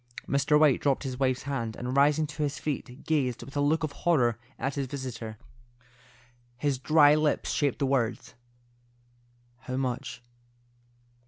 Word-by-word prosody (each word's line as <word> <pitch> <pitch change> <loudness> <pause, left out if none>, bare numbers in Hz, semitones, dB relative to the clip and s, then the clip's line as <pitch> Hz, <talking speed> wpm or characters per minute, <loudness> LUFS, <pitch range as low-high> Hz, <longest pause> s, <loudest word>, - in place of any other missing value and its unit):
Mr. 140 +2 +3
White 150 -4 +4
dropped 140 -1 +1
his 130 -2 -5
wife's 130 -2 +1
hand, 125 -6 -3
and 125 +2 -4
rising 145 +2 +4
to 150 0 -7
his 145 0 -1
feet, 140 -2 -5
gazed 130 -7 0
with 135 +4 -12
a 145 - +1
look 155 +3 +2
of 155 - -1
horror 125 -8 +1 0.2
at 135 - -2
his 140 -1 -2
visitor. 120 -5 -6 1.2
His 140 -1 -1
dry 150 +1 +5
lips 155 -1 +1
shaped 145 -4 0
the 140 - 0
words, 125 -4 -1 1.3
"How 130 0 -5
much?" 125 -1 -3
140 Hz, 150 wpm, -28 LUFS, 125-145 Hz, 1.3 s, dry